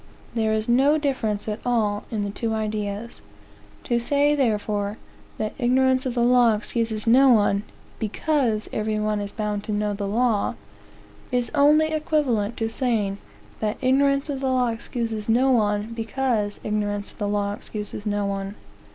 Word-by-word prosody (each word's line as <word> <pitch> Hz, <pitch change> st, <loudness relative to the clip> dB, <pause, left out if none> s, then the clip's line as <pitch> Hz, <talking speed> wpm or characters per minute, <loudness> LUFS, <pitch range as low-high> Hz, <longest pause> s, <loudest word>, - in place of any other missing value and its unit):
There 220 Hz, -2 st, +1 dB
is 220 Hz, 0 st, 0 dB
no 270 Hz, +5 st, +4 dB
difference 240 Hz, -9 st, -1 dB
at 215 Hz, +1 st, -3 dB
all 215 Hz, -4 st, 0 dB
in 215 Hz, -3 st, -2 dB
the 200 Hz, -, -3 dB
two 220 Hz, +2 st, -2 dB
ideas. 215 Hz, 0 st, -3 dB, 0.6 s
To 240 Hz, -1 st, +1 dB
say, 285 Hz, +4 st, +2 dB
therefore, 210 Hz, -5 st, 0 dB, 0.4 s
that 215 Hz, -, -3 dB
"ignorance 260 Hz, +1 st, +2 dB
of 250 Hz, -, -3 dB
the 240 Hz, -, +2 dB
law 240 Hz, -2 st, +5 dB
excuses 220 Hz, 0 st, -1 dB
no 260 Hz, +4 st, +6 dB
one, 205 Hz, -4 st, +4 dB, 0.4 s
because 225 Hz, -1 st, 0 dB
every 215 Hz, 0 st, -1 dB
one 210 Hz, 0 st, 0 dB
is 200 Hz, 0 st, -5 dB
bound 210 Hz, -1 st, -3 dB
to -, -, -4 dB
know 210 Hz, 0 st, 0 dB
the 200 Hz, 0 st, -3 dB
law," 225 Hz, 0 st, +1 dB, 0.8 s
is 245 Hz, -1 st, 0 dB
only 300 Hz, +2 st, +5 dB
equivalent 290 Hz, -9 st, 0 dB
to 225 Hz, -, -1 dB
saying 225 Hz, -4 st, -1 dB, 0.4 s
that 210 Hz, -1 st, -1 dB
"ignorance 275 Hz, +2 st, +2 dB
of 280 Hz, -3 st, -3 dB
the 265 Hz, -1 st, -1 dB
law 255 Hz, -2 st, +2 dB
excuses 225 Hz, -1 st, -3 dB
no 255 Hz, +4 st, +4 dB
one, 210 Hz, -1 st, +1 dB
because 225 Hz, -2 st, -1 dB
ignorance 205 Hz, -1 st, -2 dB
of -, -, -20 dB
the 205 Hz, -, -1 dB
law 205 Hz, 0 st, 0 dB
excuses 210 Hz, 0 st, -6 dB
no 205 Hz, -1 st, -1 dB
one." 195 Hz, 0 st, -3 dB
225 Hz, 160 wpm, -24 LUFS, 210-255 Hz, 0.8 s, no